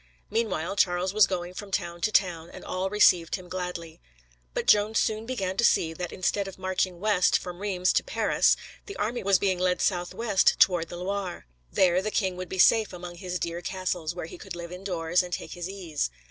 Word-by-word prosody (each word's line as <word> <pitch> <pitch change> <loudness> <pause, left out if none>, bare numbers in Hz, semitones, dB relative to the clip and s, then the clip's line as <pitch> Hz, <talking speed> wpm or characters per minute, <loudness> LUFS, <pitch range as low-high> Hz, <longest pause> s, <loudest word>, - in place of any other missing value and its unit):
Meanwhile, 200 -5 -1
Charles 180 0 +2
was 215 -1 +6
going 180 -1 -4
from 205 +2 -8
town 170 -2 -3
to 215 - +1
town, 175 -5 +1
and - - -11
all 185 +1 -2
received 180 -5 +4
him 185 -2 -9
gladly. 180 -3 -6 0.5
But - - -1
Joan 210 +1 +4
soon 220 0 0
began 195 -7 -2
to - - +2
see 165 -7 +3
that 175 +1 -5
instead 195 +2 -1
of 195 - -9
marching 185 -1 -1
west 200 -2 +3
from 180 -1 -8
Reims 185 -3 +1
to - - +2
Paris, - - +2 0.3
the 400 - -7
army 230 +4 -2
was 195 -1 +4
being 190 -2 0
led 180 0 +1
southwest 190 +3 +1
toward 175 -3 +4
the 175 - -7
Loire. 190 0 -4 0.3
There 180 -1 +3
the 215 - -2
king 190 -4 0
would 185 0 -6
be 190 - -5
safe 220 +2 +5
among 175 -1 -8
his 180 0 -4
dear 170 0 -4
castles, 180 -3 -3
where 175 - -5
he 170 - -10
could 190 -2 -8
live 170 0 -7
indoors, 180 -2 0
and 180 -1 -7
take - - -5
his 175 +1 -5
ease. 175 - -3
185 Hz, 205 wpm, -27 LUFS, 175-195 Hz, 0.5 s, was